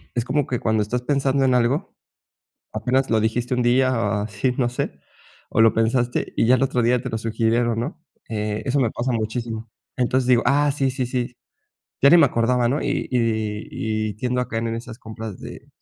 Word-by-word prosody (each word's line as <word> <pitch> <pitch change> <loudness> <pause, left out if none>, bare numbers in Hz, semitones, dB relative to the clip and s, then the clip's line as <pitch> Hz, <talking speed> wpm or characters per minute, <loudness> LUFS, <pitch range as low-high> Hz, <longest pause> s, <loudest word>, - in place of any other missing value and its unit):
es 120 - 0
como 135 +2 0
que 125 - -2
cuando 110 -2 +1
estás 120 +4 -2
pensando 135 0 +1
en 130 -1 +3
algo, 125 +5 0 0.8
apenas 125 +5 0
lo 110 -1 +3
dijiste 115 +3 0
un 125 - +1
día 130 +2 +3
o 115 -2 0
así, 110 +4 -1
no 120 -2 +2
sé, 125 - -4 0.5
o - - +1
lo 115 0 +6
pensaste 120 +2 0
y - - +3
ya 125 - +6
el 130 - -2
otro 130 -2 +1
día 120 +1 +2
te 125 - -4
lo 110 - -2
sugirieron, 115 +1 0
¿no? 155 +6 -5 0.3
Eh, 105 -1 -2
eso 135 +1 +1
me 115 -4 +2
pasa 125 +1 -2
muchísimo. 115 0 -3 0.3
Entonces, 125 +1 +1
digo: 120 -2 +5
"Ah, 145 +1 +3
sí, 135 -2 0
sí, 130 0 -2
sí, 125 -1 -3 0.7
ya 140 - +7
ni 175 - +8
me 155 - +7
acordaba, 120 0 +1
¿no?" 140 +4 0
Y 140 0 -2
y 110 0 -1
y - - -7
tiendo 125 +3 -1
a 125 - -3
caer 115 0 -2
en 115 - -2
esas 115 0 -8
compras 110 -2 -8
de - - -10
120 Hz, 210 wpm, -22 LUFS, 110-130 Hz, 0.8 s, ni